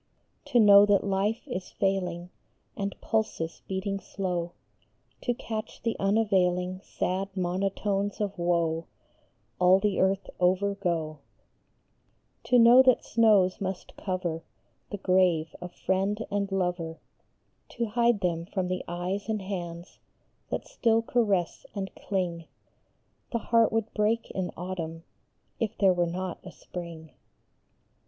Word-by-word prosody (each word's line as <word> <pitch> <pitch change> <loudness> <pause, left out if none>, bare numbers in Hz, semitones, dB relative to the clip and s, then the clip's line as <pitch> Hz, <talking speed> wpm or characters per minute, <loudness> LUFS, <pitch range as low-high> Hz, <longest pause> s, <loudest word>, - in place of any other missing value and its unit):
To 245 - +3
know 205 -2 +9
that 205 -1 +4
life 200 +3 -1
is 180 0 -5
failing 180 -3 -1 0.4
And 200 -1 -4
pulses 215 -7 -2
beating 195 +1 -2
slow; 180 -3 -3 0.7
To 245 - -1
catch 220 -2 -6
the 230 - 0
unavailing 185 -3 +1
Sad 195 +1 -3
monotones 195 +2 -1
of 205 -2 -2
woe 170 -1 0 0.7
All 180 +1 +6
the 205 0 0
earth 190 +1 +1
over 185 +3 +2
go; 165 -6 -2 1.3
To 250 - +4
know 240 +2 +8
that 255 -2 +4
snows 210 -4 +3
must 190 -1 -4
cover 180 -4 -3 0.5
The 205 - -4
grave 180 -4 +2
of 180 0 -6
friend 195 +5 -1
and 200 -1 -1
lover, 175 -3 -2 0.7
To 235 - -2
hide 235 -1 +2
them 170 -2 -1
from 185 -2 -2
the 185 0 -2
eyes 180 +5 -3
and 215 -1 0
hands 175 -3 -6 0.5
That - - -3
still 225 -1 +2
caress 205 -8 0
and 195 -1 -4
cling; 175 -4 -3 0.9
The 235 - +1
heart 230 0 +3
would 225 -1 -1
break 220 +2 0
in 185 -2 -2
autumn 165 -2 -5 0.6
If 225 -1 -2
there 195 -2 +5
were 175 -1 +1
not 180 +1 -4
a 185 - -9
spring 170 -3 -9
190 Hz, 130 wpm, -28 LUFS, 175-205 Hz, 1.3 s, know